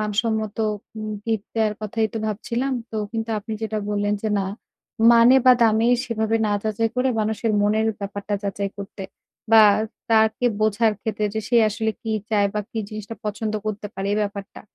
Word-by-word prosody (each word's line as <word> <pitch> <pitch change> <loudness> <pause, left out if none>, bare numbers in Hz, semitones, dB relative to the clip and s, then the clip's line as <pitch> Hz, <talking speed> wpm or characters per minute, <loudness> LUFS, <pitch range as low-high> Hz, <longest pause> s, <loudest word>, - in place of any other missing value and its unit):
মানসম্মত 215 0 -1 0.4
উম 215 0 -4
গিফট 220 -3 -2
দেয়ার 215 -1 +2
কথাই 220 +1 -1
তো 225 - -3
ভাবছিলাম। 235 +5 -2 0.2
তো 220 - -5 0.2
কিন্তু 225 0 -3
আপনি 220 +2 -7
যেটা 215 -1 -2
বললেন, 205 0 0
যে 220 - 0
না, 190 - -1 0.7
মানে 235 +2 +7
বা 255 - +9
দামেই 225 +2 +4
সেভাবে 225 -1 0
না 205 - 0
যাচাই 220 +1 0
করে 255 +1 +2
মানুষের 220 +1 -1
মনের 215 +2 +2
ব্যাপারটা 200 +1 -4
যাচাই 200 0 -2
করতে 195 -1 -7 0.5
বা 220 - +9 0.5
তাকে 220 +2 +3
বোঝার 215 +1 +3
ক্ষেত্রে 215 -1 -2
যে 220 - 0
সে 240 - +3
আসলে 220 +1 -1
কি 225 - -5 0.2
চায় 205 -2 +3
বা 210 - 0
কি 225 - -4
জিনিসটা 215 +1 -7
পছন্দ 215 +1 -3
করতে 210 0 -3
পারে 195 +1 -3
এই 210 - +1
ব্যাপারটা। 200 0 -6
215 Hz, 175 wpm, -23 LUFS, 205-225 Hz, 0.7 s, বা